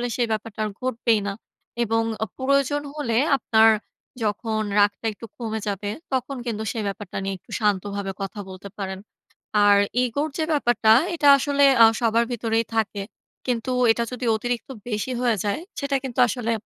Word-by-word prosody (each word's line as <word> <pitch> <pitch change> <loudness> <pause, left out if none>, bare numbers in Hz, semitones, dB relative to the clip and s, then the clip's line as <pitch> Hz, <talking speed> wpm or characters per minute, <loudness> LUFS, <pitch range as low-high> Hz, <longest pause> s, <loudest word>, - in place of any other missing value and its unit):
সেই 240 -2 +1
ব্যাপারটা 220 0 -4
আর - - -2
ঘটবেই 235 -3 +1
না। 200 - -2 0.5
এবং 225 0 +1 0.2
অ - - 0
প্রয়োজন 275 +2 +1
হলে 235 -7 -1 0.2
আপনার 225 -2 +5 0.5
যখন 215 +1 -1 0.2
রাগটা 205 +2 +2
একটু 220 - -10
কমে 220 -2 -3
যাবে 205 0 -2 0.2
তখন 260 +1 -1
কিন্তু 220 -2 -3
সেই 225 - -3
ব্যাপারটা 200 -1 -6
নিয়ে 195 0 -2
একটু - - -20
শান্তভাবে 200 -1 -1
কথা 195 +2 -5
বলতে 190 +1 -9
পারেন। 190 -2 -4 0.7
আর 205 0 +6 0.3
ইগোর 285 +5 -1
যে 320 - 0
ব্যাপারটা 240 -6 +4 0.2
এটা 295 -3 +2
আসলে 280 +1 +3 0.2
আ - - +11 0.2
সবার 230 0 +3
ভিতরেই 230 -1 0
থাকে। 205 -2 -1 0.4
কিন্তু 250 0 -1 0.2
এটা 235 +1 0
যদি 250 0 -4
অতিরিক্ত 240 +3 -3 0.2
বেশি 215 +2 -2
হয়ে 240 -3 +2
যায় 205 +8 -1 0.2
সেটা 280 0 -1
কিন্তু 260 -3 -4
আসলে 240 -2 -2
225 Hz, 160 wpm, -24 LUFS, 205-250 Hz, 0.7 s, আ